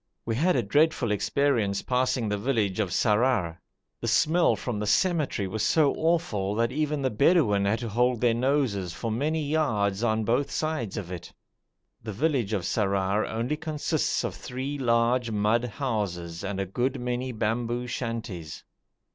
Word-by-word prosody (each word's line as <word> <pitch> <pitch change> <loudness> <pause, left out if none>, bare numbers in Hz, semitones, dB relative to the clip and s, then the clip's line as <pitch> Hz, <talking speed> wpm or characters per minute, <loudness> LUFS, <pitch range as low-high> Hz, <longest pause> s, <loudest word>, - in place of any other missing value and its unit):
We 115 - -1
had 170 +9 +2
a 125 - +2
dreadful 145 +1 +2
experience 110 -2 +1
passing 125 -2 0
the 105 0 -1
village 110 -5 0
of 105 -4 +1
Sarrar. 105 -5 +1 0.4
The - - -4
smell 170 +3 +3
from 120 -5 -4
the 105 - -2
cemetery 155 - +1
was 105 +3 -3
so 150 +2 +3
awful 160 - 0
that 115 +2 +1
even 150 0 -1
the 130 - +1
Bedouin 110 - +3
had 100 +3 +2
to 115 - -3
hold 125 +2 +1
their 120 -1 +3
noses 120 - 0
for 115 +4 -4
many 150 +7 0
yards 115 -10 0
on 110 -1 +1
both 120 +6 +1
sides 155 -10 -2
of 95 -4 -5
it. 90 -2 -7 0.7
The 110 -1 -6
village 130 -3 0
of 100 -5 -1
Sarrar 100 0 0
only 120 +7 -2
consists 155 -1 -1
of - - -2
three 135 +3 -5
large 120 0 +2
mud 110 +3 +1
houses 100 - -3
and 100 0 -3
a 95 - 0
good 125 +8 -1
many 125 +1 -2
bamboo 120 +2 -1
shanties. 115 -10 -5
115 Hz, 165 wpm, -27 LUFS, 105-135 Hz, 0.7 s, smell